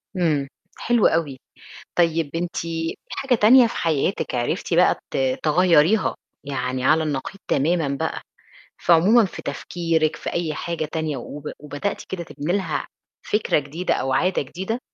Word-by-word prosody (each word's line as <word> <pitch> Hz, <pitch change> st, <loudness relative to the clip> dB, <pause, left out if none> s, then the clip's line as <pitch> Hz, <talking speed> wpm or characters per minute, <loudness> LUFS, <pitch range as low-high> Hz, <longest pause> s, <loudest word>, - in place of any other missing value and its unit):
إمم، 155 Hz, -6 st, +1 dB, 0.3 s
حلو 240 Hz, -2 st, +3 dB
أوي. 150 Hz, -5 st, -1 dB, 0.6 s
طيب 165 Hz, -3 st, +2 dB
أنتِ 175 Hz, +1 st, -3 dB
في 165 Hz, 0 st, -3 dB
حاجة 270 Hz, -2 st, 0 dB
تانية 240 Hz, +3 st, +7 dB
في 230 Hz, -, -6 dB
حياتِك 165 Hz, +1 st, 0 dB
عرفتِ 120 Hz, -1 st, -1 dB
بقى -, -, +4 dB
ت -, -, -3 dB, 0.3 s
تغيّريها 175 Hz, +4 st, +4 dB, 0.3 s
يعني 130 Hz, -2 st, -3 dB
على 160 Hz, +3 st, +4 dB
النقيض 150 Hz, +3 st, -3 dB
تمامًا 160 Hz, +2 st, +1 dB
بقى -, -, -3 dB, 0.6 s
في 175 Hz, -, +2 dB
عمومًا 205 Hz, +8 st, +6 dB
في 190 Hz, -, -6 dB
تفكيرِك 160 Hz, +1 st, -1 dB
في -, -, -5 dB
أي 165 Hz, -3 st, -1 dB
حاجة 170 Hz, -1 st, -3 dB
تانية 160 Hz, -3 st, -2 dB
وب 140 Hz, +4 st, -8 dB
وبدأتِ 150 Hz, +7 st, -4 dB
كده 185 Hz, -2 st, -4 dB
تبني 160 Hz, +1 st, -4 dB
لها 180 Hz, -7 st, -1 dB, 0.4 s
فكرة 210 Hz, -6 st, +1 dB
جديدة 150 Hz, +6 st, -2 dB
أو 135 Hz, -, -1 dB
عادة 180 Hz, +8 st, +1 dB
جديدة؟ 190 Hz, -, -4 dB
165 Hz, 150 wpm, -23 LUFS, 145-180 Hz, 0.6 s, تانية